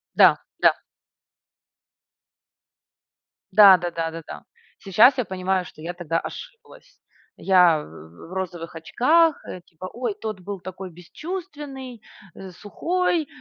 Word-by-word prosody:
Да, - - +6 0.2
да. - - +6 2.8
Да 200 -3 +8
да 175 0 -4
да 165 -1 -3
да 165 0 -8
да. 75 - -9 0.4
Сейчас 220 +8 +4
я 250 - -1
понимаю, 185 -1 -2
что 155 - -14
я 175 +2 -5
тогда 165 -2 -2
ошиблась. - - -12 0.4
Я 180 -5 +4
в 80 - -14
в - - -10
розовых 175 -3 -5
очках, 300 - +2
э, 180 - -8
типа: 175 +2 -11
"Ой, 240 -3 -3
тот 215 -1 -6
был 195 +1 -7
такой 185 0 -8
бесчувственный, 275 - -8 0.5
сухой, 330 - -2
190 Hz, 120 wpm, -23 LUFS, 170-255 Hz, 2.8 s, Да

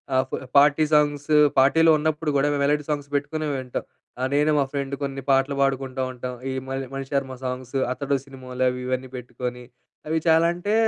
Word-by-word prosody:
ఆహ్, 130 - +4
ఫ్ - - -15 0.2
party 145 +2 +5
songs 145 0 +2 0.2
పార్టీలో 160 +5 +5
ఉన్నప్పుడు 155 0 -1
గూడా 140 +1 +3
మేము 140 - -1
మెలోడీ 150 +1 +2
సాంగ్స్ 145 -1 -2
పెట్టుకునే 150 +2 -2
వింటాం. 130 -2 -4 0.4
ఆహ్, 130 +1 0
నేను 150 +2 +3
మా 140 - +4
ఫ్రెండ్ 140 -1 -3
కొన్ని 135 0 -3
పాటలు 135 +1 +3
పాడుకుంటూ 135 -1 0
ఉంటాం. 125 0 -6 0.2
ఈ - - -3
మణి 135 0 -4
మణిశర్మ 135 -1 -3
సాంగ్సు. 130 +1 -4
'అతడు' 140 +1 -1
సినిమాలోవి 130 -2 -2
ఇవన్నీ 130 0 -2
పెట్టుకోని, 125 0 -6 0.4
అవి 160 +1 0
చాలా 160 +1 +5
అంటే 200 +5 -2
135 Hz, 170 wpm, -24 LUFS, 130-150 Hz, 0.4 s, party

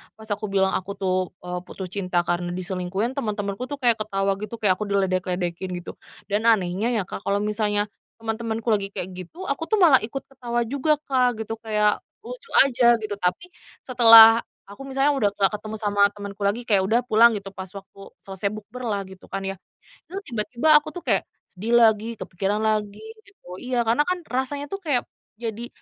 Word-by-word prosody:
pas 220 0 -13
aku 210 +1 -2
bilang 190 -1 +2
aku 190 +2 -3
tuh, 185 -1 0 0.3
eee, 180 0 -4
putus 190 -1 -7
cinta 180 -3 0
karena 175 0 -1
diselingkuhin, 185 +4 -2
teman-temanku 210 -1 -3
tuh - - -1
kayak 235 -4 +2
ketawa 195 -2 -1
gitu, 215 +2 -6
kayak 200 -4 +3
aku 210 - -2
diledek-ledekin 185 -2 -1
gitu, 170 - -9 0.4
dan 210 +2 +1
anehnya 195 0 +2
ya 215 - +1
Kak, - - -7
kalau 200 +1 +2
misalnya 210 -1 0 0.3
teman-temanku 225 0 -4
lagi 200 -2 +1
kayak 185 - -5
gitu, 185 - -9
aku 280 +4 -2
tuh 435 - +2
malah 315 -8 +7
ikut 270 +5 -5
ketawa 240 -3 -3
juga 280 +4 +1
Kak, 250 -5 +1
gitu. 225 +1 -5
Kayak 210 -2 0 0.2
lucu - - -10
aja 245 -3 +4
gitu, 210 -1 -4
tapi 200 - -2 0.3
setelah 230 -2 +9 0.3
aku 270 +7 -10
misalnya 270 +1 +1
udah 205 -5 +2
enggak 195 0 +2
ketemu 215 +1 -7
sama 205 -1 0
temanku 200 0 -9
lagi, 210 +5 0
kayak 195 -3 +3
udah 225 +4 +3
pulang 235 -1 +5
gitu 200 -2 -5
pas 190 -1 -8
waktu 195 0 -12 0.2
selesai 195 +1 -3
bukberlah 215 -1 -4
gitu 190 -1 -14
kan 195 - -5
ya, 195 0 -4 0.5
itu 375 - -8 0.2
tiba-tiba 235 +6 -1
aku 300 - -10
tuh 355 - -5
kayak - - +2 0.3
sedih 225 +6 0
lagi, 225 0 +3
kepikiran 200 +3 -2
lagi, 210 -2 0 0.3
gitu. 405 - -24
Iya, 250 -2 -1
karena 235 +6 +3
kan 365 0 0
rasanya 265 +3 -2
tuh 390 - -3
kayak 285 -9 0 0.3
jadi 230 +1 -5
215 Hz, 185 wpm, -24 LUFS, 195-240 Hz, 0.5 s, setelah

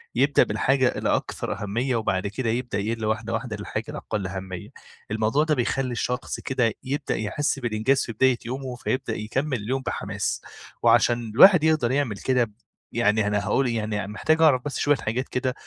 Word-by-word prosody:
يبدأ 140 +3 +4
بالحاجة 130 +5 +2
اللي - - +1
أكثر - - -3
أهمية 120 +5 -1
وبعد 100 -3 0
كده 115 +3 -2
يبدأ 120 -3 -2
يِقلّ 110 +2 -2
واحدة 110 +1 -1
واحدة 115 -1 -3
للحاجة 105 +1 -4
الأقل 105 -4 -4
أهمية، 95 +2 -6 0.4
الموضوع 110 +7 +2
ده 155 -1 +1
بيخلّي 130 +1 0
الشخص 125 +1 -3
كده 120 -4 0
يبدأ 140 +3 -2
يحِسّ 135 +6 -1
بالإنجاز 120 +3 +1
في 115 - -5
بداية 130 +2 +3
يومه 130 +1 -4
فيبدأ 125 -1 -2
يكمِّل 130 +5 -2
اليوم 130 +4 -1
بحماس، 105 -5 -3 0.4
وعشان 120 0 +3
الواحد 170 - +7
يقدر 155 -7 +2
يعمل 130 -7 0
كده، 125 -3 +1 0.4
يعني 110 -2 +2
أنا 105 0 +1
هاقول 135 -1 +2
يعني 105 -3 -2
محتاج 155 +10 +1
أعرف 135 -6 +5
بس 145 - -3
شوية 145 0 +3
حاجات 120 +4 -3
كده، 125 0 -1
120 Hz, 170 wpm, -25 LUFS, 110-130 Hz, 0.4 s, الواحد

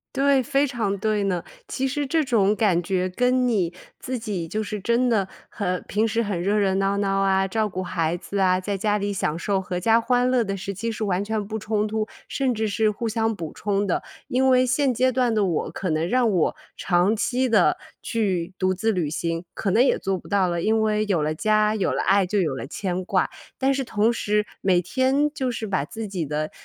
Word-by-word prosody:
对， 275 0 +3
非 275 +3 +1
常 225 -7 -2
对 215 0 0
呢。 180 -4 -1 0.2
其 270 +1 -1
实 290 +1 -2
这 320 +3 +2
种 215 -6 +2
感 200 -6 +2
觉 185 +1 -1
跟 250 +5 +2
你 185 -7 0 0.3
自 255 0 -4
己 205 -7 -4
就 215 +6 -2
是 210 0 -4
真 235 +5 +1
的， 205 -5 +1 0.2
很 180 -3 -2
平 215 +2 +1
时 225 +1 0
很 200 -5 -2
热 200 +4 +1
热 195 -2 +2
闹 195 +1 +1
闹 195 -1 0
啊， 195 0 +2
照 220 +1 0
顾 185 -2 -4
孩 165 -2 -1
子 200 +3 -5
啊， 185 -1 +4
在 200 +1 -2
家 210 +1 +1
里 205 0 -2
享 160 -5 -1
受 195 +3 0
阖 180 -1 -4
家 225 +5 +3
欢 245 +1 +2
乐 255 -1 +3
的 195 0 -2
时 195 +1 -5
期 225 +5 -3
是 225 -1 -3
完 190 -2 0
全 215 -1 -2
不 220 +2 -4
冲 215 0 -1
突， 215 0 -2 0.2
甚 265 -2 0
至 220 -1 -1
是 215 +1 +2
互 225 +2 -3
相 225 0 0
补 165 -5 -6
充 200 0 -1
的。 185 - -1 0.3
因 260 +2 +2
为 255 -1 +5
现 255 +1 +2
阶 255 +2 +2
段 245 -2 +1
的 210 - +2
我 175 -5 -1
可 190 - -4
能 160 +1 0
让 245 +2 +2
我 175 -5 +1 0.2
长 180 +3 +2
期 250 +3 0
地， 210 -6 +4 0.3
去 190 -5 -1
独 185 0 +1
自 220 +4 0
旅 175 -6 -1
行， 165 +2 -2
可 200 - -2
能 225 +6 +5
也 270 - +2
做 195 0 -1
不 - - -13
到 200 -2 +2
了， 170 -1 -1
因 220 +3 +2
为 215 0 +1
有 175 -6 +2
了 155 +1 -1
家， 215 +3 +2
有 200 - 0
了 - - 0
爱、 195 +1 +3
就 205 +3 0
有 155 -8 0
了 - - -5
牵 185 +5 -3
挂。 - - +1 0.3
但 270 +1 +2
是 270 0 -1
同 225 -1 +1
时 210 -2 0 0.2
每 185 -2 +3
天， 265 - +1
就 260 -5 -1
是 225 -2 -4
把 185 -7 0
自 220 +8 -6
己 185 -5 -3
的， 150 +1 -3
210 Hz, 250 characters per minute, -24 LUFS, 185-230 Hz, 0.3 s, 为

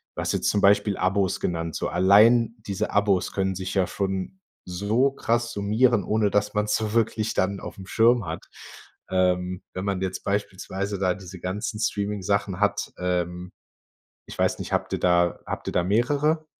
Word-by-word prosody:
du - - -3
hast - - -1
jetzt - - +1
zum 100 - +1
Beispiel 100 0 +4
Abos 95 0 +1
genannt, 85 -2 -2
so - - -2
allein 110 +6 +5
diese 100 +2 -2
Abos 100 -3 +1
können 95 -1 -1
sich 95 0 -4
ja 95 -2 +2
schon 95 - -3 0.3
so 105 +9 +1
krass 120 -3 -1
summieren, 105 +2 +2
ohne 105 -1 +1
dass 105 0 +1
man's 105 0 +1
so 110 -1 -2
wirklich 110 -1 0
dann 95 +1 0
aufm 95 - -8
Schirm 115 +1 +3
hat, - - -6 0.6
ähm, 90 0 0
wenn 95 - -4
man 100 -2 -1
jetzt 95 -1 -3
beispielsweise 100 0 -3
da 95 -2 +2
diese 95 -1 -10
ganzen 105 +3 -3
Streaming-Sachen 100 -2 -1
hat, 105 - +1
ähm, 90 0 -2 0.8
ich - - -10
weiß - - +2
nicht, - - -5
habt - - -1
ihr - - -1
da 85 -1 +2
habt - - -6
ihr - - -6
da 90 - +2
mehrere? 145 - +1
100 Hz, 175 wpm, -25 LUFS, 95-105 Hz, 0.8 s, allein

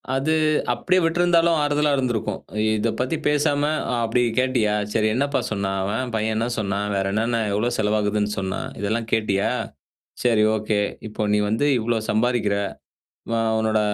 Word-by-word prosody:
அது 140 +4 +1 0.4
அப்படியே 185 +10 +1
விட்டுருந்தாலும் 170 0 +3
ஆறுதலா 145 0 +1
இருந்திருக்கும். 120 -6 -1 0.2
இ - - +1
இதைப் 115 +1 -1
பற்றிப் 145 +5 -2
பேசாம, 145 -1 +1 0.4
"அப்படி 115 +2 +1 0.2
கேட்டியா? 125 -5 +2 0.2
சரி, 110 -1 +2
என்னப்பா 140 +2 +1
சொன்னான் 100 -2 -1
அவன்? 120 +6 -2
பையன் 110 0 0
என்ன 115 +2 0
சொன்னான்? 100 0 -1
வேற 95 0 0
என்னென்ன, 115 +2 0 0.2
எவ்வளவு 120 +4 0
செலவாகுதுன்னு 105 -1 0
சொன்னான்? 95 -1 -3
இதெல்லாம் 110 +3 -1
கேட்டியா? 100 -3 +1 0.7
சரி, 115 -3 +3
ஒகே. 105 -1 0 0.3
இப்ப, 105 - -13
கு - - -1
நீ 105 - +3
வந்து 115 +7 +1
இவ்வளவு 110 -1 -1
சம்பாரிக்கிற. 110 -2 +1 1.0
உன்னோட 110 -1 +1
110 Hz, 145 wpm, -23 LUFS, 105-130 Hz, 1.0 s, விட்டுருந்தாலும்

